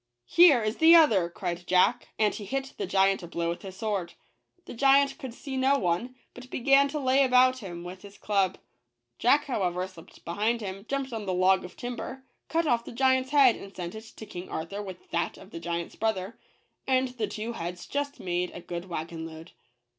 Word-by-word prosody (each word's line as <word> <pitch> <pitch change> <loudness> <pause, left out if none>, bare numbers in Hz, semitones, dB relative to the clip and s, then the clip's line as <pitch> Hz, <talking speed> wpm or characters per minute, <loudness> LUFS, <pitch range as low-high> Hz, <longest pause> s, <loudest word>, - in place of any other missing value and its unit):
" - - -56
Here 295 - +6
is 215 +1 -2
the 325 +1 +8
other," 215 - +5
cried 175 -1 -5
Jack, 185 +7 +3
and 210 -1 +2
he 210 - -6
hit 270 +6 -4
the 200 - -2
giant 195 +1 +3
a 175 - -8
blow 170 0 -2
with 170 - -4
his 190 -2 -9
sword. 195 -4 -3 0.5
The - - -8
giant 275 +4 +4
could 265 -5 -6
see 265 +3 -7
no 265 +2 +3
one, 195 +6 -1 0.2
but 250 +1 -12
began 275 +3 +4
to 300 +2 -4
lay 270 0 +3
about 255 0 +4
him 175 -6 -7
with 180 +1 -9
his 200 -1 -13
club: 195 -3 0 0.6
Jack, 285 +5 +4
however, 185 -8 -1
slipped 180 -3 -16
behind 215 +7 0
him, 195 0 -7
jumped 275 -2 -2
on 215 -3 -5
the 185 - 0
log 185 +1 +3
of 180 - -11
timber, 245 +2 -6 0.3
cut 330 0 +1
off 235 -5 +2
the - - -9
giant's 260 +1 +2
head, 275 -5 +6
and 195 0 -11
sent 175 -1 -5
it 220 +1 -9
to 220 - -9
King 180 -2 -8
Arthur 180 +6 -4
with 190 -3 -9
that 170 - -1
of - - -14
the 165 - -7
giant's 170 0 -4
brother; 220 -1 -2 0.5
and 260 -1 +2
the 235 -4 -3
two 215 +3 -5
heads 175 -2 -6
just 285 0 -3
made 180 0 -1
a - - -6
good 175 0 -6
wagon 165 -2 -5
load. 160 +1 -11
210 Hz, 210 wpm, -28 LUFS, 180-260 Hz, 0.6 s, the